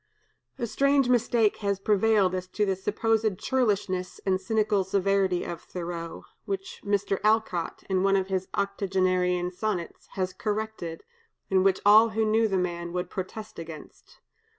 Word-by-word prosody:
A 240 - -2
strange 275 +2 +2
mistake 235 -3 +2
has 200 -2 -1
prevailed 205 -1 +3
as 185 0 -3
to 210 +3 0
the 195 -1 0
supposed 215 +1 0
churlishness 200 -8 -1
and 190 -1 +1
cynical 210 -1 +1
severity 195 -1 +1
of 170 - -6
Thoreau, 170 -2 -6 0.2
which 195 -1 -5
Mr. 200 -1 0
Alcott, 215 -6 0
in 190 -1 +1
one 195 0 +3
of 190 -1 +1
his 190 -1 -2
octogenarian 185 -2 0
sonnets, 185 -2 -4
has 185 -1 -2
corrected, 210 -5 -4 0.5
and 190 -1 +4
which 195 -1 +2
all 215 +2 +7
who 220 0 0
knew 220 +1 +3
the 195 -2 0
man 170 -1 -2
would 180 0 -3
protest 205 +2 -6
against. 160 -2 -11
195 Hz, 150 wpm, -27 LUFS, 185-215 Hz, 0.5 s, all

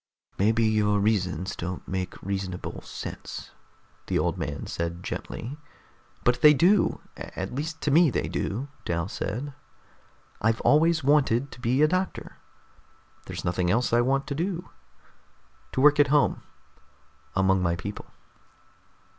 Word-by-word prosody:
"Maybe 110 +3 +3
your 105 -2 +2
reasons 95 -4 0
don't 90 +1 -5
make 95 -1 -4
reasonable 95 -2 -4
sense," - - -7 0.6
the - - +1
old - - +1
man 70 0 -4
said 85 +1 -4
gently. 135 +9 -5 0.6
"But 120 0 +2
they 150 -1 +8
do! 185 +7 +3
At 95 +4 -6
least 160 +4 -4
to 150 - 0
me, 165 +2 +6
they - - -1
do," 120 +8 -3 0.2
Dal 85 0 -1
said. 125 +9 -4 0.9
"I've 110 +1 +2
always 160 +1 +4
wanted 140 -2 +3
to 125 - -12
be 125 +5 +2
a - - +6
doctor. 185 +3 -2 0.9
There's - - -6
nothing 85 0 0
else 115 +5 +1
I 120 - +5
want 135 +3 +1
to 145 - -3
do. 175 +3 -3 1.0
To 130 - +1
work 150 +1 +6
at 145 - +6
home, 145 +1 +2 0.9
among 95 -1 +3
my 85 -1 +1
people." 100 +4 -7
115 Hz, 140 wpm, -26 LUFS, 95-145 Hz, 1.0 s, they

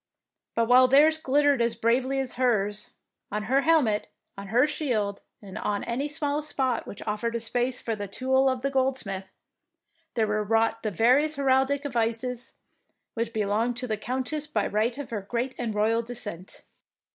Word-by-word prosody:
But 230 - +2
while 255 +1 +7
theirs 300 +4 +5
glittered 285 -2 +3
as 235 0 +1
bravely 255 +4 +1
as 265 -2 -3
hers, 210 -5 0 0.4
on 210 +1 -2
her 265 +6 +2
hel 320 -1 +4
met, 210 -3 -1 0.3
on 200 0 -8
her 240 +6 +4
shield, 220 -10 -2 0.2
and 195 -2 -8
on 205 -1 -2
any 255 +5 -2
smallest 295 0 -2
spot 260 -4 -1
which 200 - -8
offered 220 +2 -2
a - - 0
space 245 +2 -1
for 225 - -3
the 205 -1 -5
tool 265 +6 +2
of 260 -1 -2
the 275 - 0
goldsmith, 255 -8 -1 0.9
there 225 -2 +2
were 210 0 0
wrought 225 +1 +1
the 215 - -1
various 255 - +3
heraldic 270 +1 +2
devices 245 -1 -2 0.6
which 230 0 -2
be 215 -2 -1
longed 225 +4 0
to 250 - -3
the 220 -3 -1
Countess 260 +7 -3
by 215 -9 0
right 225 +4 0
of 285 -4 -7
her 210 -3 -2
great 240 +6 -3
and 225 -3 -2
royal 220 +2 +2
descent. 220 -6 -6
240 Hz, 180 wpm, -26 LUFS, 215-265 Hz, 0.9 s, while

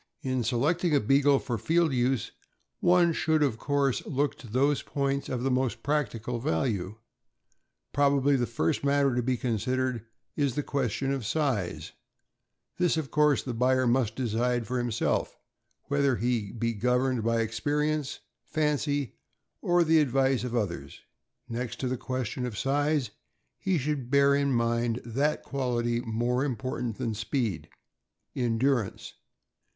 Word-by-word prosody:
In 130 -2 0
selecting 150 - +1
a - - +5
Beagle 140 +5 +4
for 120 -4 -3
field 165 -2 +2
use, 125 0 0 0.5
one 175 -1 +4
should 160 -2 +2
of 120 -6 0
course 140 -3 0
look 145 0 0
to 125 - -11
those 135 +6 +2
points 140 -1 -2
of 125 -1 -2
the 135 - +1
most 130 -1 0
practical 125 -5 -1
value. 110 - -1 1.0
Probably 140 0 +3
the 120 -2 0
first 140 +6 -1
matter 140 -1 +3
to 125 - +1
be 125 +1 0
considered 125 0 -1 0.3
is 140 -5 0
the 145 - -1
question 135 0 -1
of 135 -3 -3
size; 115 - -1 0.9
this, 175 -2 +2
of 155 -4 -3
course, 150 -2 +3
the 125 - -4
buyer 130 +2 +2
must 120 -3 +1
decide 120 0 0
for 125 +3 -2
himself, 120 -2 -1 0.5
whether 140 -2 +1
he 115 -4 -1
be 115 0 -1
governed 125 +2 +1
by 115 0 +2
experience, 145 +6 -1 0.2
fancy, 145 -3 -1 0.4
or 175 0 +3
the 160 0 +4
advice 135 -2 +2
of 125 -1 -3
oth 105 -6 +1
ers. 70 -4 -9 0.5
Next 120 +1 -4
to 130 - -1
the 130 - -1
question 125 0 -3
of 110 -4 -6
size, 145 -2 +1 0.5
he 190 -2 +1
should 140 -3 -2
bear 140 +1 +5
in 140 0 +2
mind 115 -1 +1
that 140 +6 0
quality 120 -3 -1
more 120 +3 0
important 125 -4 -3
than 115 - -2
speed 110 - -2 0.4
— - - -55
endurance. 120 -2 0
130 Hz, 145 wpm, -28 LUFS, 120-140 Hz, 1.0 s, a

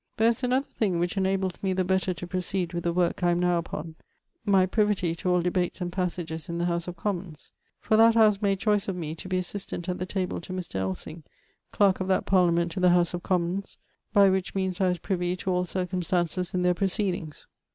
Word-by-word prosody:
There 225 +1 +4
is 235 - -1
an 250 -1 0
other 265 +2 +2
thing 195 -10 -1
which 175 +4 -1
inables 190 -1 -1
me 190 -1 0
the 185 0 +1
better 190 0 +1
to 180 0 -5
proceed 180 0 -2
with 170 0 -3
the 170 - +2
work 175 +2 0
I 175 - +3
am 175 0 +2
now 180 -1 +2
upon, 165 -1 -6 0.5
my 195 -2 +4
privity 200 -4 +1
to 170 +2 -3
all 180 -1 +2
debates 180 +1 -1
and 175 -1 -3
passages 175 -2 -3
in 170 - -3
the 170 - 0
house 170 0 -1
of 175 -1 -6
Commons: 175 -5 -4 0.3
for 220 - +1
that 225 +1 +6
house 215 -2 +5
made 200 -1 +2
choice 210 0 +1
of 195 - -2
me 160 -3 -4
to 165 - -9
be 185 - +1
assistant 185 -1 -4
at 180 - -2
the 185 - -3
table 185 -3 -2
to 185 - -8
Mr. 180 - -4
Ellsing, 95 - -4 0.5
clark 195 -2 +3
of 185 - -2
that 190 - +1
parlament 170 -2 +3
to 175 - -4
the 180 0 +5
house 175 0 +3
of 175 - -3
Commons, 180 +2 -1 0.3
by 200 -2 +6
which 190 0 0
means 190 -1 -1
I 190 - +4
was 180 0 +1
privey 180 +1 -2
to 185 - -2
all 180 0 +1
circumstances 180 -1 -1
in 180 - +1
there 180 0 +4
procedings. 180 -4 -2
180 Hz, 230 wpm, -27 LUFS, 175-190 Hz, 0.5 s, that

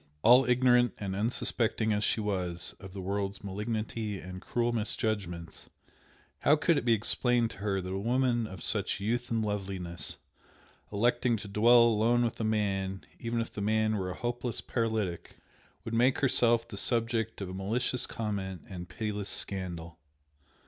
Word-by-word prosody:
All 125 +3 +7
ignorant 125 -1 +4
and 95 -2 -4
unsuspecting 110 0 0
as 105 +1 0
she 110 - +1
was 90 -4 -2
of 95 - -10
the 95 0 -6
world's 100 0 -3
malignity 105 +1 -3
and 90 0 -8
cruel 120 0 0
misjudgments, 105 -6 -3 0.7
how 150 - +5
could 155 +1 +2
it - - -8
be 120 - +5
explained 120 +2 +2
to - - -11
her 100 -1 -1
that 90 0 -4
a 95 - -2
woman 120 +1 +1
of 95 -4 -9
such - - 0
youth 120 +4 -1
and 115 -1 0
loveliness, 95 -5 -3 0.7
electing 120 +3 +2
to 105 - -8
dwell 115 +4 +6
alone 115 +1 +3
with 115 - -3
a - - -1
man, 95 -3 -1
even 115 0 -2
if 115 - -3
the 105 - -5
man 110 +1 +2
were 95 -3 -2
a 90 - -5
hopeless 120 -1 -2
paralytic, 110 -7 -2 0.5
would 115 - -5
make 125 +3 +3
herself 120 -3 +3
the 105 -4 -7
subject 115 +1 0
of 95 -2 -5
malicious 115 +6 0
comment 100 -5 -4
and 90 -2 -8
pitiless 105 -2 -3
scandal! 85 -4 -2
110 Hz, 160 wpm, -30 LUFS, 95-120 Hz, 0.7 s, All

